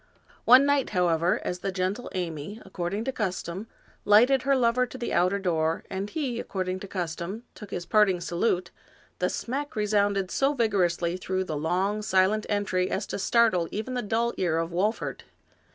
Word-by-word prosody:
One 255 Hz, +3 st, +8 dB
night, 285 Hz, -2 st, +2 dB
however, 175 Hz, 0 st, +2 dB
as 180 Hz, -, -3 dB
the 195 Hz, +1 st, -2 dB
gentle 190 Hz, +5 st, -2 dB
Amy, 170 Hz, +3 st, -4 dB
according 190 Hz, +3 st, -3 dB
to 265 Hz, -, -2 dB
custom, 190 Hz, -2 st, -3 dB, 0.4 s
lighted 245 Hz, +6 st, +5 dB
her 275 Hz, +1 st, +2 dB
lover 250 Hz, 0 st, +2 dB
to 260 Hz, -, -9 dB
the 240 Hz, -, -3 dB
outer 180 Hz, +3 st, +3 dB
door, 165 Hz, -4 st, 0 dB
and 195 Hz, +2 st, -3 dB
he, 265 Hz, -6 st, -2 dB
according 185 Hz, -3 st, -3 dB
to 200 Hz, -, -8 dB
custom, 180 Hz, +4 st, -4 dB
took 210 Hz, -, -11 dB
his 175 Hz, -3 st, -4 dB
parting 200 Hz, -2 st, +3 dB
salute, 175 Hz, +1 st, -1 dB, 0.5 s
the 180 Hz, -, +1 dB
smack 280 Hz, +4 st, -4 dB
resounded 205 Hz, -2 st, +1 dB
so 275 Hz, +2 st, +1 dB
vigorously 180 Hz, -7 st, +1 dB
through 185 Hz, 0 st, -2 dB
the 160 Hz, -4 st, -4 dB
long, 185 Hz, +7 st, 0 dB
silent 200 Hz, +1 st, +2 dB
entry 190 Hz, -3 st, 0 dB
as 195 Hz, +1 st, -2 dB
to -, -, -5 dB
startle 195 Hz, -5 st, +3 dB
even 220 Hz, +5 st, -4 dB
the 250 Hz, -, -1 dB
dull 230 Hz, +2 st, 0 dB
ear 170 Hz, -3 st, +1 dB
of 165 Hz, +1 st, -2 dB
Wolfert. 200 Hz, +6 st, -1 dB
195 Hz, 170 wpm, -27 LUFS, 180-230 Hz, 0.5 s, One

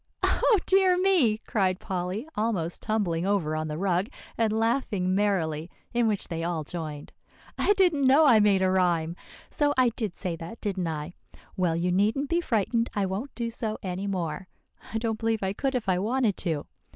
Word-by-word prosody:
"Oh, 445 Hz, -, +3 dB
dear 375 Hz, -1 st, +4 dB
me!" 360 Hz, -, +3 dB
cried 190 Hz, -4 st, 0 dB
Polly, 185 Hz, -, -3 dB
almost 200 Hz, -6 st, -1 dB
tumbling 195 Hz, -7 st, 0 dB
over 185 Hz, -6 st, 0 dB
on 155 Hz, 0 st, -2 dB
the 150 Hz, 0 st, -4 dB
rug, 185 Hz, +3 st, 0 dB, 0.3 s
and 225 Hz, -2 st, +1 dB
laughing 220 Hz, -4 st, 0 dB
merrily, 175 Hz, -6 st, 0 dB, 0.2 s
in 240 Hz, -1 st, +2 dB
which 210 Hz, -3 st, +1 dB
they 165 Hz, -2 st, -4 dB
all 170 Hz, -2 st, -2 dB
joined; 150 Hz, -2 st, -7 dB, 0.4 s
"I 410 Hz, -, +3 dB
didn't 345 Hz, -9 st, +3 dB
know 285 Hz, +4 st, +6 dB
I 235 Hz, -6 st, +6 dB
made 200 Hz, -2 st, +4 dB
a 185 Hz, -, +3 dB
rhyme. 170 Hz, -3 st, +1 dB, 0.4 s
So 290 Hz, -2 st, +1 dB
I 255 Hz, -2 st, +5 dB
did 220 Hz, -5 st, -4 dB
say 180 Hz, -4 st, -3 dB
that, 170 Hz, +8 st, -8 dB
didn't 190 Hz, -4 st, -2 dB
I? 155 Hz, +1 st, -4 dB, 0.4 s
Well, 175 Hz, -3 st, +1 dB
you 175 Hz, +2 st, 0 dB
needn't 215 Hz, +10 st, +1 dB
be 340 Hz, +1 st, +2 dB
frightened, 230 Hz, -, 0 dB
I 205 Hz, -2 st, +1 dB
won't 195 Hz, +9 st, -4 dB
do 235 Hz, -1 st, -3 dB
so 220 Hz, -1 st, -3 dB
any 190 Hz, +1 st, -3 dB
more. 180 Hz, -2 st, -3 dB, 0.4 s
I 225 Hz, -, -1 dB
don't 225 Hz, -1 st, -2 dB
believe 225 Hz, -2 st, 0 dB
I 190 Hz, 0 st, 0 dB
could 270 Hz, +5 st, -2 dB
if 235 Hz, -5 st, -2 dB
I 180 Hz, -1 st, +2 dB
wanted 225 Hz, 0 st, +1 dB
to. 160 Hz, -4 st, -2 dB
200 Hz, 190 wpm, -27 LUFS, 175-230 Hz, 0.4 s, know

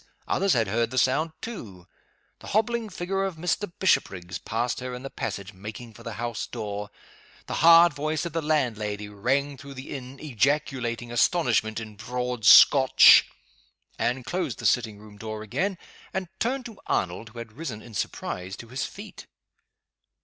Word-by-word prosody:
others 195 Hz, -1 st, +2 dB
had 115 Hz, -3 st, +2 dB
heard 115 Hz, +3 st, 0 dB
the 130 Hz, -, -6 dB
sound 145 Hz, +6 st, +2 dB
too. 105 Hz, -, -8 dB, 0.5 s
The -, -, -12 dB
hobbling 225 Hz, +1 st, 0 dB
figure 195 Hz, +1 st, -2 dB
of 190 Hz, -3 st, -2 dB
Mr. 175 Hz, +4 st, -2 dB
Bishopriggs 90 Hz, -, 0 dB
passed 120 Hz, +2 st, -2 dB
her 125 Hz, 0 st, -5 dB
in 125 Hz, -, -8 dB
the 135 Hz, -, -7 dB
passage, 100 Hz, -2 st, -5 dB
making 110 Hz, +4 st, -9 dB
for 115 Hz, -, -14 dB
the 115 Hz, -1 st, -6 dB
house 115 Hz, 0 st, -4 dB
door. 105 Hz, -3 st, -5 dB, 0.6 s
The -, -, -5 dB
hard 170 Hz, 0 st, +8 dB
voice 155 Hz, +3 st, -2 dB
of 170 Hz, -, -5 dB
the 165 Hz, -, -1 dB
landlady 110 Hz, -9 st, -1 dB
rang 135 Hz, +7 st, -1 dB
through 140 Hz, +1 st, -11 dB
the 130 Hz, +1 st, -9 dB
inn, 135 Hz, 0 st, -7 dB
ejaculating 125 Hz, -3 st, -1 dB
astonishment 115 Hz, -5 st, +2 dB
in 110 Hz, -2 st, -9 dB
broad 125 Hz, -1 st, -3 dB
Scotch. 130 Hz, +3 st, +8 dB, 0.7 s
Anne 125 Hz, +1 st, 0 dB
closed 180 Hz, +8 st, -3 dB
the -, -, -7 dB
sitting 110 Hz, -4 st, +2 dB
room 105 Hz, 0 st, -14 dB
door 110 Hz, 0 st, -5 dB
again, 185 Hz, -, -2 dB, 0.4 s
and 190 Hz, -2 st, -2 dB
turned 255 Hz, +3 st, -1 dB
to 225 Hz, -4 st, -10 dB
Arnold 90 Hz, +5 st, -1 dB
who 115 Hz, -, -15 dB
had 115 Hz, -2 st, -7 dB
risen, 120 Hz, -6 st, -6 dB
in 120 Hz, -, -13 dB
surprise, 95 Hz, -1 st, -4 dB
to 115 Hz, -, -11 dB
his 130 Hz, +3 st, -3 dB
feet. 205 Hz, +2 st, -11 dB
125 Hz, 165 wpm, -26 LUFS, 110-160 Hz, 0.7 s, hard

